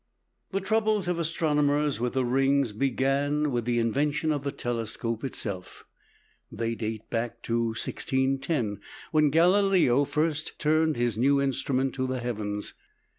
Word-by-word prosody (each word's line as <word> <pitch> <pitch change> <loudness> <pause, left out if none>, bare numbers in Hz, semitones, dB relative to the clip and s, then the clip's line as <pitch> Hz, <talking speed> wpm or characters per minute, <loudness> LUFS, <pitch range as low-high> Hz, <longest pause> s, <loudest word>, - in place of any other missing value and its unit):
The 195 0 -2
troubles 215 0 +1
of 175 -1 0
astronomers 150 -4 +1
with 120 0 -1
the 130 -1 +1
rings 135 -1 +2
began 140 +4 +1
with 120 -2 -1
the 120 0 +1
invention 145 +7 +1
of 145 -2 -1
the 140 - -2
telescope 115 -1 -3
itself. 100 -8 -5 0.7
They 115 +1 -2
date 110 -1 -5
back 115 0 -3
to 115 0 0
1610, 130 - -1 0.3
when 155 -2 +4
Galileo 175 -4 +4
first 155 +1 -1
turned 155 0 +2
his 120 -3 -1
new 140 +3 +4
instrument 135 -1 0
to 130 -1 -2
the 130 0 -2
heavens 105 -4 -4
(p. - - -31
135 Hz, 140 wpm, -27 LUFS, 120-150 Hz, 0.7 s, when